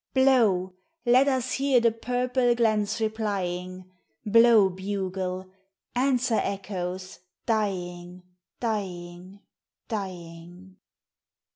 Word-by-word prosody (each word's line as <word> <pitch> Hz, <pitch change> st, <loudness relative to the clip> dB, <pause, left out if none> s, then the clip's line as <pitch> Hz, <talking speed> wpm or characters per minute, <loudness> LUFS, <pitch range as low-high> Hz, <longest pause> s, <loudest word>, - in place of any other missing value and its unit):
Blow, 225 Hz, -9 st, +3 dB, 0.3 s
let 255 Hz, +3 st, +5 dB
us 260 Hz, -2 st, 0 dB
hear 270 Hz, -2 st, +3 dB
the 230 Hz, -1 st, +3 dB
purple 245 Hz, +1 st, 0 dB
glens 215 Hz, -2 st, +1 dB
replying: 185 Hz, -5 st, -3 dB, 0.4 s
Blow, 230 Hz, -1 st, +6 dB
bugle; 190 Hz, -1 st, -4 dB, 0.4 s
answer, 250 Hz, -2 st, +2 dB
echoes, 185 Hz, -2 st, -5 dB, 0.3 s
dying, 180 Hz, -5 st, -2 dB, 0.4 s
dying, 185 Hz, -3 st, -5 dB, 0.5 s
dying. 180 Hz, -2 st, -7 dB
200 Hz, 80 wpm, -26 LUFS, 185-235 Hz, 0.5 s, Blow